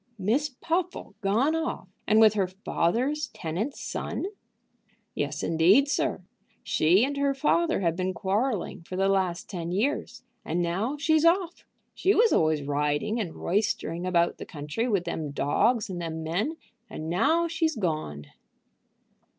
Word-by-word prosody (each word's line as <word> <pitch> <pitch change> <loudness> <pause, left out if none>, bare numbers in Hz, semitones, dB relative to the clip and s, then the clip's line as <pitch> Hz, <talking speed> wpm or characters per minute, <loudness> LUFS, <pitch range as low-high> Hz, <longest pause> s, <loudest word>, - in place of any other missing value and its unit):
"Miss 235 +10 +1
Puffle 335 +7 -3
gone 230 +11 +2
off, 325 - -3 0.2
and 215 +1 +5
with 220 -2 +7
her 195 -3 +1
father's 235 - -1
tenant's 185 - -3
son!" - - -4 0.9
"Yes - - -3
indeed, 180 - +4
sir. 285 - 0 0.4
She 180 +9 +3
and 285 +1 -3
her 280 -1 +1
father 325 - +2
have 170 -3 +1
been 185 0 -1
quarrelling 205 +3 -1
for 175 +2 -8
the 195 +1 +2
last 185 -3 0
ten 175 -4 -5
years, 250 +6 -1 0.2
and 165 +3 -2
now 190 +11 -1
she's 315 +1 +2
off. 345 +1 +2 0.3
She 390 +2 +2
was 460 0 +4
always 155 -2 +2
riding 145 +10 0
and 180 -7 -4
roistering 185 -3 -1
about 170 -1 +1
the - - -6
country 150 +10 -3
with 200 -7 +1
them 155 -4 -3
dogs 210 - +1
and 180 -2 -5
them 160 -1 -4
men; 200 - -1 0.3
and 155 - -6
now 315 - +2
she's 325 -2 0
gone." 155 - -3
200 Hz, 150 wpm, -27 LUFS, 170-280 Hz, 0.9 s, with